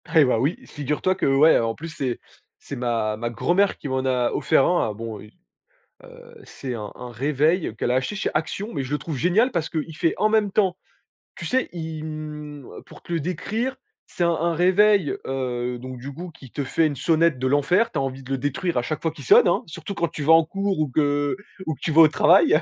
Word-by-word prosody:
Eh 155 -3 +7
bah, 125 -3 +2
oui, 145 +8 0
figure-toi 150 +6 -1
que 185 - -1
ouais, 140 +4 +5
en 115 -1 -1
plus 165 +2 -7
c'est 130 -5 -2 0.4
c'est 140 - -8
ma 115 -4 -1
ma 120 +1 -3
grand-mère 180 - +1
qui - - -7
m'en 130 -1 -1
a 125 -2 +1
offert 135 - +3
un, 175 -11 +1
heu. - - -7
Bon, 110 -1 -6
heu, 105 - -13 1.1
c'est 130 -2 -7
un 105 -2 -6
un 125 - -8
réveil 150 - 0
qu'elle 120 - -2
a - - +2
acheté 130 +11 -1
chez - - -1
Action, 180 +7 -2
mais 140 - -2
je 130 - -8
le 150 - +1
trouve 150 0 -5
génial 195 - +3
parce 170 -6 -2
qu'il 160 -1 -4
fait 170 -2 +1
en 215 - +2
même 215 -2 +2
temps 190 -3 +1 0.6
tu - - -7
sais, 260 0 0
il, 160 -2 -6
hem, 150 -2 -7 0.2
pour - - -15
te 175 - -6
le 165 - +1
décrire, 220 - -3 0.3
c'est 175 - -3
un 170 - +3
un 170 +1 0
réveil, 190 0 +4
heu, 125 -2 -2
donc 130 0 -8
du 135 +3 -7
coup 175 +4 -8
qui 130 -5 -15
te 145 - -3
fait 160 +4 +1
une 145 - -4
sonnette 165 +2 +2
de 130 +1 -1
l'enfer, 145 - +2
tu 155 - -2
as - - 0
envie 135 0 -4
de 130 - -9
le 135 - +1
détruire 170 +6 -2
à - - +3
chaque 155 +5 -4
fois 165 - 0
qu'il 150 -4 -12
sonne, - - +7
hein, 175 - +2
surtout 165 +5 -7
quand 170 -3 0
tu 155 -2 -6
vas 160 +3 +6
en 165 0 +6
cours 195 +2 -2
ou 155 - +1
que 145 0 +1 0.3
ou 160 - -2
que - - -26
tu 160 - -1
vas 160 +2 +7
au 160 - +9
travail, 155 +1 +5
150 Hz, 240 wpm, -23 LUFS, 130-175 Hz, 1.1 s, au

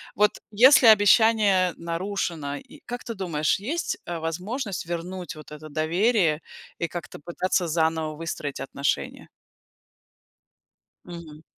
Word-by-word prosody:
Вот 210 +2 +4 0.2
если 245 +3 +7
обещание 205 -3 +5
нарушено, 170 -4 -3
и - - -12
как 245 0 -6
ты 230 - -6
думаешь, 170 -4 0
есть, 300 - -3
э, 175 - -4
возможность 185 - -4
вернуть 175 +1 -5
вот 155 -1 -13
это 150 +1 -9
доверие 165 +2 +1 0.4
и 170 - -2
как-то 170 0 -8
пытаться 175 +3 -1
заново 160 -1 0
выстроить 150 -3 -5
отношения? 140 0 -3 1.8
Мгм. 160 -3 -10
175 Hz, 115 wpm, -25 LUFS, 160-205 Hz, 1.8 s, если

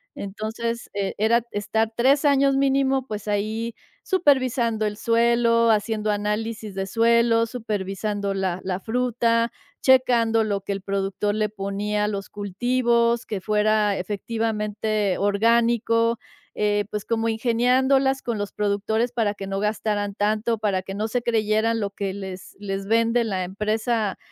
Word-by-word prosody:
entonces, 225 +4 -4
eh, 200 -1 -1
era 225 +3 +3
estar 220 +2 -1
3 275 +5 +3
años 275 -1 +4
mínimo, 270 -1 +2
pues 210 -1 -6
ahí 215 +3 -2 0.3
supervisando 255 - +2
el 210 0 -3
suelo, 230 0 +3
haciendo 215 0 0
análisis 210 0 -3
de 195 0 -3
suelo, 230 +2 +3
supervisando 205 -3 -3
la 190 -2 -1
la 185 -1 -2
fruta, 230 0 +1 0.3
checando 235 -4 +4
lo 205 -2 -1
que 200 +1 -3
el 195 - -5
productor 200 +1 -1
le 215 0 +1
ponía 205 +1 -2
a - - 0
los 200 -1 -5
cultivos, 235 +3 +1
que 210 - -4
fuera 210 0 +1
efectivamente 210 0 -2
orgánico, 230 +2 +2 0.4
eh, 205 0 +1
pues 210 -1 -4
como 230 0 0
ingeniándolas 260 +4 +2
con 235 -2 -3
los 205 -1 -4
productores 210 +3 -1
para 220 -4 0
que 195 -1 -7
no 195 0 -2
gastaran 210 -1 -1
tanto, 215 +3 0
para 200 -3 0
que 195 +1 -7
no 215 +2 -1
se 245 +2 -1
creyeran 225 0 +1
lo 200 -2 -2
que 200 -1 -4
les 190 -1 -8
les 195 -1 -4
vende 230 +2 +2
la 190 -5 -2
empresa 215 +2 -1
220 Hz, 145 wpm, -23 LUFS, 205-235 Hz, 0.4 s, años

